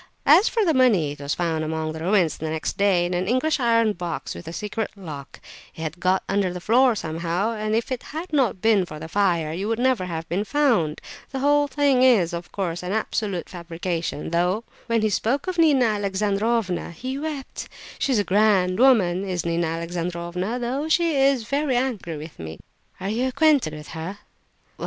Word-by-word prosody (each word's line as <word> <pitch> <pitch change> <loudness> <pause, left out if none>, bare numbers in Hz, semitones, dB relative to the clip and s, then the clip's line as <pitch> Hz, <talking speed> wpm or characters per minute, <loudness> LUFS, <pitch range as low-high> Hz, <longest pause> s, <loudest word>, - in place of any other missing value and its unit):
As 405 - +6
for 450 -3 +1
the 325 - +3
money, 220 - +3
it 145 - -9
was 140 0 -2
found 165 -2 -1
among 155 0 -2
the 160 - -7
ruins 175 -2 +1
next 160 0 -3
day 195 -3 +3
in 175 - -2
an 180 +1 -1
English 255 +7 +1
iron 230 -3 +3
box 175 -3 -5
with 170 - -10
a - - -5
secret 210 +4 -3
lock; 155 -8 -9 0.4
it - - -9
had 160 +2 -5
got 185 +2 +1
under 195 -2 +1
the 180 - -5
floor 240 +5 +4
somehow, 170 +4 -2
and 215 -1 -2
if 230 +4 -1
it 255 - -2
had 320 +3 -7
not 245 -10 +1
been 220 -4 +4
for 155 -3 -8
the 160 +1 -7
fire 170 -4 +1
it 180 +4 -3
would 225 +1 0
never 250 -5 +1
have 165 -2 -5
been 185 +5 -1
found! 225 - +1 0.3
The 270 - -5
whole 290 +2 +3
thing 280 -2 +2
is, 215 -10 +4
of 170 0 -6
course, 175 -4 -3
an 180 +2 -3
absolute 210 -4 -2
fabrication, 170 -2 -4
though 180 +6 +1 0.2
when 230 -2 +1
he 215 - +3
spoke 240 +8 0
of 370 -2 -3
Nina 290 -6 +5
Alexandrovna 205 -1 0
he 255 +10 -5
wept! 295 -3 -5 0.3
She's 265 -4 +1
a 205 - +2
grand 195 -2 +2
woman, 200 -9 +4
is 185 -3 -3
Nina 170 0 0
Alexandrovna, 170 +5 -3
though 260 +6 -2
she 335 -1 +2
is 270 -3 +3
very 280 +3 0
angry 220 -11 -2
with 155 +1 -10
me!" 80 0 -7 0.4
"Are 190 - -3
you 240 +5 0
acquainted 280 - +3
with 150 0 -10
her?" 165 +5 -6
200 Hz, 195 wpm, -23 LUFS, 170-250 Hz, 0.4 s, As